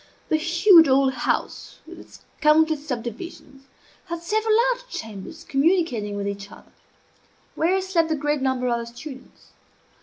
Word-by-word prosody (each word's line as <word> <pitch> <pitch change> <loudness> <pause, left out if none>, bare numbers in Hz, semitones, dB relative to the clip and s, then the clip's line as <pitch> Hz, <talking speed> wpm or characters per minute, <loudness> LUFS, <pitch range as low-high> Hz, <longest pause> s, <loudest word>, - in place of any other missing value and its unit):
The 315 - +3
huge 340 +1 +6
old 265 0 +3
house, - - -3
with - - -12
its - - -15 0.2
countless 310 0 +3
subdivisions, 270 - -7 0.4
had 335 0 -6
several 435 +4 +1
large - - -6
chambers 220 - -8
communicating 275 - 0
with 200 0 -3
each 200 0 -6
other, - - -16 0.8
where 360 +4 +1
slept 350 -4 0
the 315 - +1
greater 295 -1 -1
number 260 -1 0
of 235 -1 0
the 235 - -6
students. 260 +3 -12
300 Hz, 145 wpm, -23 LUFS, 250-340 Hz, 0.8 s, huge